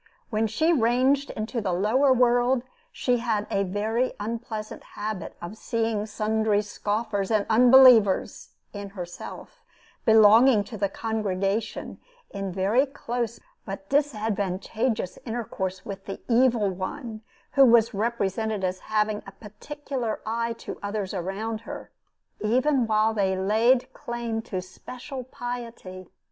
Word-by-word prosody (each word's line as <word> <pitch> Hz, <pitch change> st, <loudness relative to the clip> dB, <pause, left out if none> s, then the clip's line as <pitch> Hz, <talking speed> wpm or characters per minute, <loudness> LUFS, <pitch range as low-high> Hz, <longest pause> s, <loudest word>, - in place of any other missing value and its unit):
When 220 Hz, 0 st, +1 dB
she 315 Hz, +11 st, +2 dB
ranged 260 Hz, +2 st, +2 dB
into 220 Hz, +2 st, -3 dB
the 195 Hz, -3 st, -1 dB
lower 220 Hz, +10 st, +3 dB
world, 245 Hz, 0 st, +3 dB, 0.3 s
she 250 Hz, -, 0 dB
had 225 Hz, -3 st, -1 dB
a 195 Hz, -, +1 dB
very 215 Hz, +6 st, -1 dB
unpleasant 220 Hz, 0 st, -5 dB
habit 210 Hz, -4 st, -6 dB
of 175 Hz, +5 st, -7 dB
seeing 225 Hz, -2 st, -1 dB
sundry 215 Hz, 0 st, 0 dB
scoffers 205 Hz, -1 st, -2 dB
and 215 Hz, -2 st, +2 dB
unbelievers 245 Hz, -3 st, +5 dB, 0.2 s
(in 200 Hz, -1 st, -6 dB
herself) 180 Hz, -, -8 dB, 0.4 s
belonging 220 Hz, +1 st, +6 dB
to 220 Hz, -, -9 dB
the 200 Hz, -1 st, 0 dB
congregation, 210 Hz, -1 st, -2 dB, 0.3 s
in 195 Hz, -1 st, -4 dB
very 200 Hz, +9 st, +2 dB
close 240 Hz, -4 st, -4 dB, 0.2 s
but 195 Hz, -1 st, -8 dB
disadvantageous 220 Hz, -5 st, -1 dB
intercourse 190 Hz, -6 st, -4 dB
with 195 Hz, -1 st, -7 dB
the 195 Hz, -, -6 dB
Evil 235 Hz, -4 st, +3 dB
One, 215 Hz, +5 st, -6 dB, 0.3 s
who 275 Hz, -, +6 dB
was 230 Hz, -3 st, +5 dB
represented 215 Hz, -1 st, -1 dB
as 185 Hz, 0 st, -1 dB
having 215 Hz, -1 st, +1 dB
a -, -, -8 dB
particular 230 Hz, +4 st, -5 dB
eye 230 Hz, +1 st, -1 dB
to 230 Hz, -, -8 dB
others 205 Hz, -1 st, -3 dB
around 200 Hz, +5 st, -3 dB
her, -, -, -9 dB, 0.5 s
even 250 Hz, +4 st, +2 dB
while 215 Hz, 0 st, +2 dB
they 190 Hz, -3 st, +1 dB
laid 225 Hz, +6 st, +2 dB
claim 235 Hz, -2 st, -4 dB
to 185 Hz, -5 st, -5 dB
special 255 Hz, +8 st, -8 dB
piety. 235 Hz, -8 st, -7 dB
220 Hz, 125 wpm, -26 LUFS, 200-240 Hz, 0.5 s, belonging